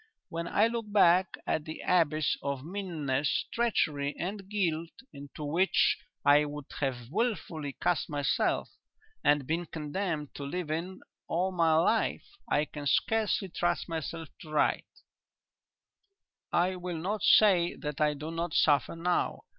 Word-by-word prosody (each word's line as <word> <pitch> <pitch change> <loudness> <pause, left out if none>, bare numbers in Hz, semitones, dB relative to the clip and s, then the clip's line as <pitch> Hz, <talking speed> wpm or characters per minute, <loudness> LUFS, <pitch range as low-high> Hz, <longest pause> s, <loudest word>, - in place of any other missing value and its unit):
When 170 +1 -4
I 210 - +3
look 230 -2 -3
back 185 -2 +4
on 155 - -1
the 155 -1 -7
abyss 155 -4 +2
of 140 -1 -3
meanness, 155 -7 -1
treachery 150 -12 0
and 195 +2 -5
guilt 170 -6 -1 0.2
into 140 +2 -9
which 170 +6 +3 0.3
I 145 +1 +6
would 150 -1 -6
have 125 -3 -3
wilfully 165 - -2
cast 170 -7 0
myself, 145 -2 0 0.5
and 145 -2 +3
been 165 +4 -2
condemned 155 -1 -3
to 140 - -7
live 155 +3 -4
in 175 +4 -4 0.3
all 180 +3 0
my 165 -3 +3
life, 195 +8 +2 0.2
I 150 +1 +2
can 145 -1 -6
scarcely 215 +2 +1
trust 175 0 -1
myself 165 -1 -5
to 155 - -11
write. 155 -1 +1 1.7
"I 180 +2 +2
will 180 -1 -4
not 195 +6 -2
say 190 -5 +5
that 150 0 -5
I 150 -1 +3
do 150 +3 -6
not 165 -1 -3
suffer 145 0 +3
now. 175 +2 -1
165 Hz, 140 wpm, -30 LUFS, 150-185 Hz, 1.7 s, I